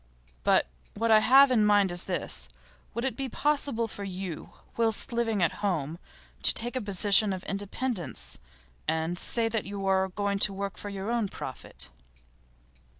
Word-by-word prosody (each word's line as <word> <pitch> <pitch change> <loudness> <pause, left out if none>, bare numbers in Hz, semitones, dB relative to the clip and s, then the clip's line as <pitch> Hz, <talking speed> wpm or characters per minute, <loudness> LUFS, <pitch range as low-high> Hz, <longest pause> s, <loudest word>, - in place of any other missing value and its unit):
But - - +4 0.3
what 225 +2 +1
I 215 - +8
have 270 +4 +7
in 225 -4 +4
mind 205 -2 +4
is 175 0 +2
this. - - -3 0.5
Will 235 +2 -1
it 260 -4 -1
be 270 +1 -4
possible 280 -5 0
for 205 - -8
you, 185 -4 -5 0.2
whilst 225 0 +1
living 225 -5 +1
at 170 - +3
home, 170 -5 -1 0.4
to - - +3
take 240 +3 +2
a 255 - -1
position 205 0 +4
of 185 0 -4
independence, 200 - -4 0.5
and 160 +2 0
say 225 +5 +2
that 225 -2 -2
you 200 0 -5
are 190 0 +2
going 200 +1 -1
to 195 - +3
work 200 0 -4
for 205 - -6
your 200 +2 -4
own 235 -3 +1
profit? 130 - -7
205 Hz, 165 wpm, -28 LUFS, 190-230 Hz, 0.5 s, I